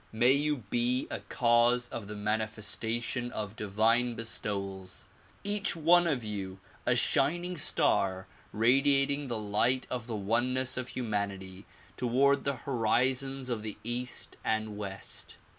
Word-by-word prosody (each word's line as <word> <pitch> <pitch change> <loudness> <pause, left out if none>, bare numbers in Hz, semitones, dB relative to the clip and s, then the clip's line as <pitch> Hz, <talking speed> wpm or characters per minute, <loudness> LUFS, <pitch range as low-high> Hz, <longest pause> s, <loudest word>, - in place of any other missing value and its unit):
May 120 +3 +4
you 145 -2 +1
be 120 +2 0
a - - -3
cause 120 +1 +2
of 105 -4 -6
the 105 - -7
manifestation 110 +3 -2
of 105 -1 -4
divine 115 +4 +1
bestowals; 100 -4 -4 0.4
each 205 -1 0
one 170 +2 +4
of 135 -7 0
you 95 -3 -5 0.3
a - - +4
shining 175 +6 +1
star 95 - +2 0.3
radiating 140 +4 +3
the 120 -2 -2
light 110 +5 +1
of 125 -2 -4
the 115 - -3
oneness 120 +5 0
of 125 -1 -4
humanity 100 -5 -4 0.3
toward 135 +3 +2
the 140 -1 0
horizons 130 +2 +1
of 115 -3 -2
the 105 -1 -6
east 120 +2 -3
and 110 -1 -1
west. 100 -2 -5
120 Hz, 130 wpm, -30 LUFS, 105-130 Hz, 0.4 s, May